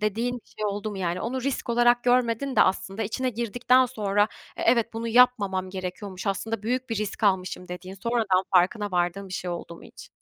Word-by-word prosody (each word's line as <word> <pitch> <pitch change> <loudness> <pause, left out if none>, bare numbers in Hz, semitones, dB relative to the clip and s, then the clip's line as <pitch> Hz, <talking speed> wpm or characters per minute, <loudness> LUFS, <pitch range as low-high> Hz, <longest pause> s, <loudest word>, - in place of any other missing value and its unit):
dediğin 225 +4 -1
bir 240 - -13
şey 215 - -2
oldu 205 +1 -2
mu 200 - -6
yani? 180 -1 -2
Onu 255 +2 -3
risk 270 -2 -2
olarak 240 0 +3
görmedin 250 +2 +1
de - - +8
aslında 195 +2 -1
içine 255 +5 -1
girdikten 245 +3 +2
sonra, 205 -4 0 0.3
"E - - -4
evet, 235 -1 +3
bunu 230 +1 -4
yapmamam 205 -6 +3
gerekiyormuş 185 +1 -6
aslında 215 +2 -2
büyük 250 +3 -2
bir 225 - -1
risk 210 +1 -4
almışım." 185 -3 0
dediğin 180 +1 -7
sonradan 200 -3 +1
farkına 200 +3 +3
vardığın 180 +2 -1
bir - - -9
şey 180 0 -3
oldu 170 -1 -6
mu - - -15
hiç? - - -13
215 Hz, 200 wpm, -26 LUFS, 190-240 Hz, 0.3 s, de